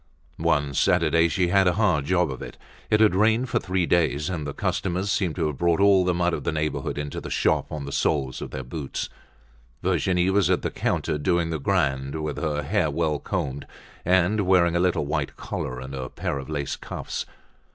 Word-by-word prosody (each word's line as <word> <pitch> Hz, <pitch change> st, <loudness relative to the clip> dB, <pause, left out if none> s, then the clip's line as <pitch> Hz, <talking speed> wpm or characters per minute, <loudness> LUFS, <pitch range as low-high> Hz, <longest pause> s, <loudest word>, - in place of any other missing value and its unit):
One 70 Hz, -1 st, +1 dB
Saturday 85 Hz, +2 st, +3 dB
she 90 Hz, +2 st, 0 dB
had 95 Hz, 0 st, +4 dB
a 90 Hz, -, +4 dB
hard 90 Hz, -8 st, +2 dB
job 90 Hz, -2 st, +2 dB
of 65 Hz, -, -7 dB
it. -, -, -8 dB, 0.3 s
It 105 Hz, 0 st, +3 dB
had 110 Hz, -4 st, +5 dB
rained 110 Hz, +5 st, +2 dB
for -, -, +1 dB
three 95 Hz, -1 st, 0 dB
days 80 Hz, -1 st, +1 dB
and 80 Hz, -5 st, -3 dB
the -, -, -3 dB
customers 95 Hz, +2 st, -1 dB
seemed 90 Hz, -7 st, 0 dB
to 85 Hz, -, 0 dB
have 75 Hz, -3 st, -3 dB
brought 85 Hz, 0 st, +2 dB
all 100 Hz, -2 st, +5 dB
the 90 Hz, 0 st, +1 dB
mud 85 Hz, 0 st, +1 dB
of -, -, -3 dB
the -, -, 0 dB
neighborhood 75 Hz, -2 st, -2 dB
into 75 Hz, 0 st, -4 dB
the -, -, -7 dB
shop -, -, +1 dB
on 75 Hz, -2 st, -4 dB
the 70 Hz, -, -6 dB
soles 65 Hz, -3 st, 0 dB
of -, -, -5 dB
their 65 Hz, -, -5 dB
boots. 70 Hz, +2 st, -5 dB, 0.7 s
Virginie 90 Hz, 0 st, +2 dB
was 100 Hz, -1 st, +3 dB
at -, -, +1 dB
the -, -, -1 dB
counter 75 Hz, -, -1 dB
doing 85 Hz, +1 st, +1 dB
the 80 Hz, -, -2 dB
grand, 70 Hz, -5 st, 0 dB
with 75 Hz, -1 st, -3 dB
her 75 Hz, -1 st, -1 dB
hair -, -, +1 dB
well 80 Hz, -3 st, 0 dB
combed, 70 Hz, +2 st, -3 dB, 0.4 s
and 95 Hz, +3 st, +2 dB
wearing 85 Hz, -2 st, +4 dB
a -, -, +3 dB
little 90 Hz, 0 st, +1 dB
white -, -, -2 dB
collar 65 Hz, 0 st, -4 dB
and 65 Hz, +1 st, -8 dB
a 65 Hz, -2 st, -5 dB
pair 70 Hz, -, -3 dB
of 65 Hz, -, -8 dB
lace 70 Hz, -3 st, -2 dB
cuffs. -, -, -5 dB
85 Hz, 210 wpm, -25 LUFS, 75-90 Hz, 0.7 s, had